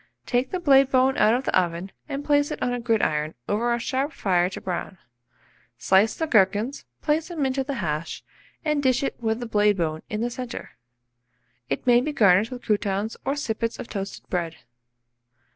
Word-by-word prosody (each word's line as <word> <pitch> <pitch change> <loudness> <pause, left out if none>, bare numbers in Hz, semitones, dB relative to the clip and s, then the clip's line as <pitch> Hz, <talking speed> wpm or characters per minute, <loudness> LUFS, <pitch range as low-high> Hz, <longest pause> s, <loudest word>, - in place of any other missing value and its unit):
Take 250 +1 0
the 370 - -2
blade 275 -5 +5
bone 260 0 +3
out 215 +2 +5
of 255 - -1
the - - -1
oven, 175 +1 0 0.2
and 285 0 -4
place 290 0 +3
it - - -5
on 245 - 0
a 245 - -2
gridiron 160 -10 0
over 230 +4 0
a 235 - +2
sharp 265 +5 -2
fire 180 -2 +1
to 190 - -7
brown. 185 +1 -4 0.8
Slice 195 +4 +3
the 320 - -1
gherkins, 215 +2 +2 0.2
put 310 +1 +1
them 320 -5 -2
into 265 0 0
the 275 +1 -4
hash, 160 -6 -3 0.4
and 300 -2 +1
dish 260 -1 +2
it - - -2
with 220 0 0
the 245 - -4
blade 210 -2 +2
bone 160 -2 -1
in 210 +1 -3
the 240 +1 -1
centre. 250 0 -6 1.0
It 135 - -2
may 245 -1 +5
be 300 +3 -3
garnished 205 -3 +4
with 250 -1 -8
croutons 205 0 -1
or 275 - 0
sippets 230 -5 -2
of - - -8
toasted 195 -1 -6
bread. 170 -3 -2
230 Hz, 190 wpm, -25 LUFS, 195-270 Hz, 1.0 s, blade